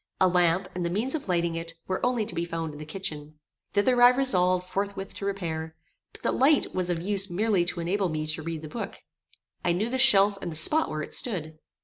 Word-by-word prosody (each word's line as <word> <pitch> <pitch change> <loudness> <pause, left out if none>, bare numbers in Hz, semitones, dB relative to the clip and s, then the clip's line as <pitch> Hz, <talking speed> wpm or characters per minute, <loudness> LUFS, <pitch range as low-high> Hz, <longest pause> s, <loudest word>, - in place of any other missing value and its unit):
A 185 - +5
lamp, 180 +1 +2
and 180 - -3
the 170 - -1
means 220 +9 -1
of 310 -7 -4
lighting 170 -2 0
it, 165 0 -5
were 185 - -3
only 245 -3 +1
to 230 - -3
be 170 - -2
found 165 -2 -4
in 145 - -10
the 155 - -8
kitchen. 155 -3 -6 0.4
Thither 245 +4 +3
I 245 - +10
resolved 185 -9 +3
forthwith 200 0 -4
to 200 - -5
repair; 160 -5 -4 0.4
but - - -13
the - - +2
light 285 +3 +3
was 180 -1 -1
of 175 -2 0
use 200 0 +2
merely 195 0 +1
to 175 0 -3
enable 185 +3 0
me 155 -1 -3
to 155 0 -4
read 160 0 -5
the - - -6
book. 215 +5 -7 0.6
I 175 - +2
knew 210 +7 -1
the 260 - 0
shelf 200 -6 +6
and 170 - -4
the - - -7
spot 300 - +2
where 155 0 -3
it - - -9
stood. 160 -10 -2
180 Hz, 235 wpm, -27 LUFS, 165-205 Hz, 0.6 s, I